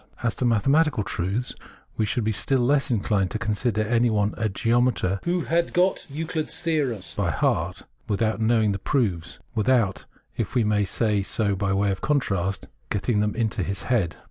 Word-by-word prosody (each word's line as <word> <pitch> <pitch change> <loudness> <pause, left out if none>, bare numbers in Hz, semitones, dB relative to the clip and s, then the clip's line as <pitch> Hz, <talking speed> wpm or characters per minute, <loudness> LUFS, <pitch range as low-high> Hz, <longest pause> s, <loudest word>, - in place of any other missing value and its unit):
— - - -37
' - - -13
As 115 -2 +1
to 125 - 0
mathematical 135 +3 +3
truths, 100 +7 -2 0.4
we 110 - 0
should 120 - -1
be 110 - +1
still 130 +5 0
less 135 +3 +2
inclined 100 -4 +1
to - - -3
consider 110 0 0
anyone 110 -2 +2
a 110 -2 -1
geometer 115 -2 +1
who 175 +1 +1
had 170 +1 0
got 180 +2 +2
Euchd's 160 +1 -1
theorems 145 - -1
by 100 -4 -1
heart 75 - 0
(auswendig) - - -32
without 110 +2 0
know 115 +1 +3
ing 105 - +2
the 95 - -3
proofs, 95 - -1 0.2
without, 110 -3 +1 0.3
if - - -3
we 120 - +3
may 105 -1 +2
say 105 +1 +1
so 100 +1 0
by 95 0 -1
way 100 +1 +2
of 95 - -4
contrast, 100 -10 0 0.2
getting 105 +2 0
them 105 0 0
into 110 -2 -1
his 95 +1 -3
head 105 -10 +1
{inwendig). - - -22
110 Hz, 195 wpm, -24 LUFS, 100-125 Hz, 0.4 s, mathematical